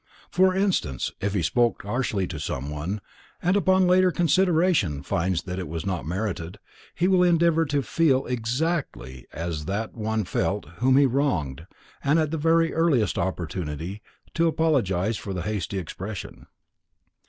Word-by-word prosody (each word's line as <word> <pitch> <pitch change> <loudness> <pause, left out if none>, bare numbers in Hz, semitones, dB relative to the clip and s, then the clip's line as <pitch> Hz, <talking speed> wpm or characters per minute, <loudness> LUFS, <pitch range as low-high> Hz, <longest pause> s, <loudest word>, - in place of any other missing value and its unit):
For 185 +1 +4
instance, 185 - 0
if 100 +1 -1
he 90 - +1
spoke 120 +7 +1
harshly 105 -2 -1
to 80 - -6
someone, 75 +9 -4 0.4
and 180 +3 +1
upon 190 -2 +4
later 185 +1 +5
consideration 170 - +2
finds 90 +3 -1
it 90 0 -4
was 80 +3 -5
not 90 -5 -3
merited, 90 0 -3 0.4
he 175 - +2
will 185 -1 +4
endeavor 170 -2 +4
to 145 -1 0
feel 135 0 +2
exactly 120 - -2
as 80 -2 -4
that 105 +4 -3
one 110 -1 -1
felt - - -1
whom 130 +2 +3
he 140 - +6
wronged 95 - -1 0.4
and 145 +3 +3
at 155 -2 +1
the 165 - -1
very 165 +1 +3
earliest 150 - +2
opportunity 85 0 -4 0.3
to 170 0 +2
apologize 115 - +1
for 95 -1 -5
the 90 - -3
hasty 100 -1 -3
expression. 95 +3 -7
110 Hz, 145 wpm, -25 LUFS, -, 0.4 s, he